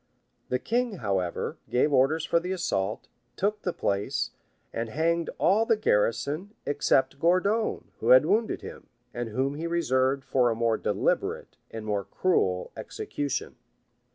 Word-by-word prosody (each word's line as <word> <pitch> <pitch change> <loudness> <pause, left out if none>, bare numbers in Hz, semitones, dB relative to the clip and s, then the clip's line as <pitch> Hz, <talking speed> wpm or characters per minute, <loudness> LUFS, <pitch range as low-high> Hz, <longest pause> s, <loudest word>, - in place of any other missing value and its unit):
The 125 - +1
king, 240 - -1
however, 95 - -2
gave 140 +4 +2
orders 145 +5 +3
for 170 - +3
the 180 +2 -4
assault, 110 - -2 0.3
took 210 +2 -1
the 180 - -1
place, 125 +2 -1 0.4
and 115 0 -3
hanged 165 +6 0
all 210 +4 +4
the 225 -1 +2
garrison, 150 - 0
except 135 -1 +1
Gourdon, 185 +7 +1
who - - -1
had - - +8
wounded 220 +1 +1
him, - - -9 0.3
and 120 -1 -3
whom 130 +5 -1
he 160 +3 -4
reserved 135 -5 +1
for 125 -2 +2
a 115 - 0
more 115 -1 +1
deliberate - - -1
and 110 -1 -7
more 105 -2 -1
cruel 95 - 0
execution. 145 -2 -4
140 Hz, 145 wpm, -27 LUFS, 115-180 Hz, 0.4 s, had